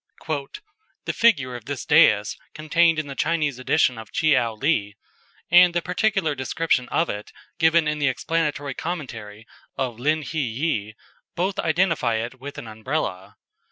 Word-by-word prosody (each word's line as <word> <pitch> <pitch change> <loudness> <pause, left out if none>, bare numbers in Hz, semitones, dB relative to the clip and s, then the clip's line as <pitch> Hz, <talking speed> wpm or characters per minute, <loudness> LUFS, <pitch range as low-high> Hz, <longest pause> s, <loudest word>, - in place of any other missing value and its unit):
"The - - -2
figure 140 - +2
of 120 -2 -9
this 140 0 -5
dais 110 -10 +4 0.2
contained 165 +2 +2
in 155 - -1
the 140 - -7
Chinese 150 -3 -1
edition 130 -2 +2
of 110 - -11
Tcheou 125 -8 +1
Li, 105 -9 0 0.6
and 175 0 +7
the 175 - +2
particular 185 -3 0
description 130 -1 -1
of 165 - +1
it 105 0 -6 0.3
given 160 -1 +4
in 150 0 -1
the 145 - +2
explanatory 145 +2 -1
commentary 115 -11 -6 0.3
of 125 -4 -3
Lin 155 +4 +1
hi 160 +2 -4
ye, 115 -4 -2 0.4
both 190 +3 -1
identify 160 -8 +1
it 115 +3 -4
with 140 +2 -8
an - - -7
Umbrella. 110 -4 -4
145 Hz, 150 wpm, -23 LUFS, 115-165 Hz, 0.6 s, and